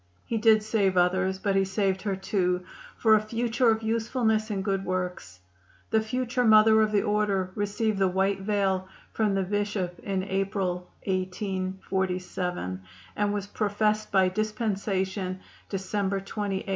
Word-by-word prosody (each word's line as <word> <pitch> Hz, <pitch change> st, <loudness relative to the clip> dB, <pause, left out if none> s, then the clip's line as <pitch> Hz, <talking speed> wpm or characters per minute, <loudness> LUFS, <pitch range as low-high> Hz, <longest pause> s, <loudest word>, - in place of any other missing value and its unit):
He 230 Hz, -, -1 dB
did 215 Hz, -1 st, +5 dB
save 200 Hz, -4 st, +1 dB
others, 185 Hz, +2 st, +2 dB
but 195 Hz, 0 st, 0 dB
he 195 Hz, -, +4 dB
saved 190 Hz, 0 st, 0 dB
her, 200 Hz, -2 st, -1 dB
too, 180 Hz, -2 st, 0 dB, 0.3 s
for 220 Hz, -2 st, +4 dB
a 215 Hz, -, +5 dB
future 230 Hz, +2 st, +1 dB
of 220 Hz, 0 st, +1 dB
usefulness 220 Hz, -1 st, 0 dB
and 195 Hz, -2 st, -2 dB
good 195 Hz, -1 st, 0 dB
works. 180 Hz, -, -4 dB, 0.5 s
The 220 Hz, -, +4 dB
future 250 Hz, +2 st, -1 dB
Mother 220 Hz, -1 st, +6 dB
of 215 Hz, -1 st, +2 dB
the 205 Hz, -1 st, +2 dB
Order 205 Hz, -3 st, 0 dB
received 205 Hz, +1 st, -1 dB
the 190 Hz, -, +4 dB
white 190 Hz, +1 st, +1 dB
veil 195 Hz, -2 st, 0 dB, 0.3 s
from 210 Hz, -3 st, +1 dB
the 195 Hz, -, +1 dB
Bishop 200 Hz, -2 st, -2 dB
in 195 Hz, -2 st, -2 dB
April, 190 Hz, -2 st, -2 dB, 0.2 s
1847, 185 Hz, -, -2 dB, 0.3 s
and 205 Hz, 0 st, +1 dB
was 205 Hz, -1 st, -2 dB
professed 210 Hz, +1 st, 0 dB
by 190 Hz, -1 st, +4 dB
dispensation 195 Hz, -2 st, -2 dB, 0.3 s
December 195 Hz, 0 st, -1 dB
28, 195 Hz, 0 st, -3 dB
1848. -, -, -10 dB
195 Hz, 145 wpm, -27 LUFS, 190-215 Hz, 0.5 s, Mother